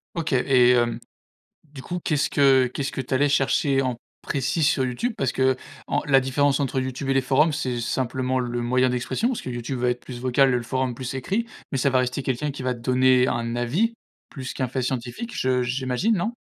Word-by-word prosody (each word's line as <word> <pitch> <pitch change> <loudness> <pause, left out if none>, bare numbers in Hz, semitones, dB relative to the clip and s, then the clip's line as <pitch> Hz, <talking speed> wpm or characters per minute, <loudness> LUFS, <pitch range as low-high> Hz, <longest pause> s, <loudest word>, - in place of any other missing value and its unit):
OK, 160 -4 -2
et 125 -1 +4
hem, 120 -1 +2 0.7
du 145 -3 -12
coup, 180 +4 -4
qu'est-ce 150 -4 0
que 135 -2 +4
qu'est-ce 135 +2 -4
que - - -4
tu 130 +1 -3
allais 145 +2 +3
chercher 135 0 +2
en 125 -2 -2 0.3
précis 140 +4 -1
sur 145 -3 +3
YouTube? 210 - -2
Parce 130 -2 0
qu' - - -5 0.5
en - - 0
la 135 -2 +5
différence 140 +2 +1
entre 135 -1 0
YouTube 130 +1 -4
et 135 - +2
les 135 - +4
forums, 150 +5 +3
c'est 130 -5 -2
simplement 130 +1 -1
le 120 -1 -2
moyen 125 +1 +2
d'expression, 125 - -1
parce 255 - -2
que - - -7
YouTube 120 +2 -4
va 125 0 +1
être 125 - -3
plus 120 -2 -9
vocal 130 +2 +3
et 125 - +2
le 120 - -2
forum 130 0 -2
plus 130 +2 -5
écrit, 195 - -2 0.3
mais 135 - 0
ça 140 - +2
va 130 - +3
rester 125 +2 -2
quelqu'un 130 +3 -1
qui 135 -1 -7
va 125 -1 -1
donner 125 +1 +3
un 115 0 -2
avis 170 - 0 0.3
plus 130 -2 -6
qu'un 130 - -2
fait 130 +1 -2
scientifique, 130 - -4
je 130 -1 +1
j'imagine, 130 - 0
non? 215 +7 -2
130 Hz, 220 wpm, -24 LUFS, 125-140 Hz, 0.7 s, la